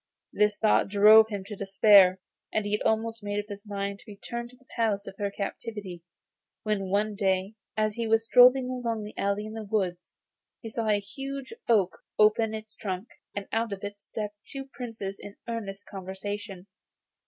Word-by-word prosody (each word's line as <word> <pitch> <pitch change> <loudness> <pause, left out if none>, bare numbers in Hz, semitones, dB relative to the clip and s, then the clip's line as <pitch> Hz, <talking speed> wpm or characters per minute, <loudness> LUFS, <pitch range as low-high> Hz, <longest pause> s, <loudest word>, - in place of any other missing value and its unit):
This 210 0 +2
thought 215 - +3
drove 215 +2 +7
him 200 -3 -4
to 205 +2 -7
despair, 195 -1 +6 0.3
and 215 -1 0
he 205 - -3
had 210 - 0
almost 225 0 0
made 205 0 -3
up 205 - -4
his 205 +1 -8
mind 200 -1 -3
to - - -16
return 235 +4 -6
to 250 - -17
the 260 +1 -26
place 215 -4 +1
of - - -7
her 200 -1 0
captivity, 200 -2 -5 0.6
when 205 -3 -1
one 210 +2 +1
day, 195 0 0 0.2
as 215 -1 +1
he 230 +1 -2
was 225 0 +3
strolling 250 +2 +7
along 235 -4 -2
an 210 - -9
alley 200 +1 -1
in 215 - -7
the 220 -1 -5
woods, 190 -4 -2 0.4
he 225 - -7
saw 225 0 -2
a 210 -1 +3
huge 270 - -7 0.2
oak 200 -6 +3 0.2
open 215 +1 +4
its 215 0 -9
trunk, 190 +1 -4 0.3
and 205 -1 -4
out 225 0 0
of 200 0 -5
it 205 0 -6
step 210 -2 -5 0.2
two 270 -1 -6
Princes 220 -6 -6
in 205 0 -9
earnest 205 -4 -5
conversation. 195 0 -6
210 Hz, 185 wpm, -28 LUFS, 200-225 Hz, 0.6 s, drove